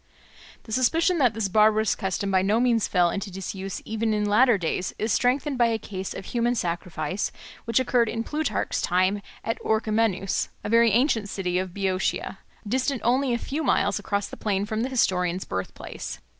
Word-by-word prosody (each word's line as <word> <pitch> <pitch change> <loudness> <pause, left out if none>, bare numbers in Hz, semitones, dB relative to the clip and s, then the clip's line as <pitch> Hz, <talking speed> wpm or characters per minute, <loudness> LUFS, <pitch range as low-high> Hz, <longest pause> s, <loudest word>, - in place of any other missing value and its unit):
The 220 - -12
suspicion 325 - +2
that 245 -6 +3
this 220 -3 0
barbarous 215 +2 +4
custom 195 +1 -2
by 190 -1 +4
no 205 +4 +2
means 235 -3 +2
fell 175 -2 +3
into 200 0 -4
disuse 195 0 -6
even 220 0 -1
in 210 0 0
later 220 +2 +4
days 180 +1 -2
is 220 +1 -1
strengthened 265 +3 +1
by 240 - +5
a 225 -1 0
case 195 -3 -6
of - - -7
human 240 +2 0
sacrifice 175 -2 -2 0.3
which 230 +1 +2
occurred 245 -3 +2
in 225 - -2
Plutarch's 305 +5 -1
time 185 +3 +1 0.2
at 225 - -3
Orchomenus, 215 -3 0
a - - -4
very 230 +1 +5
ancient 225 -2 +2
city 180 -2 -1
of 185 -1 -3
Boeotia, 190 -1 -1 0.3
distant 260 +3 0
only 255 +2 +2
a 235 - +1
few 285 +6 -4
miles - - +2
across 200 -1 -1
the - - -10
plain 200 -2 -1
from 215 +1 -2
the 255 - -1
historian's 180 -7 +1
birthplace. 95 0 -6
215 Hz, 180 wpm, -25 LUFS, 190-235 Hz, 0.3 s, by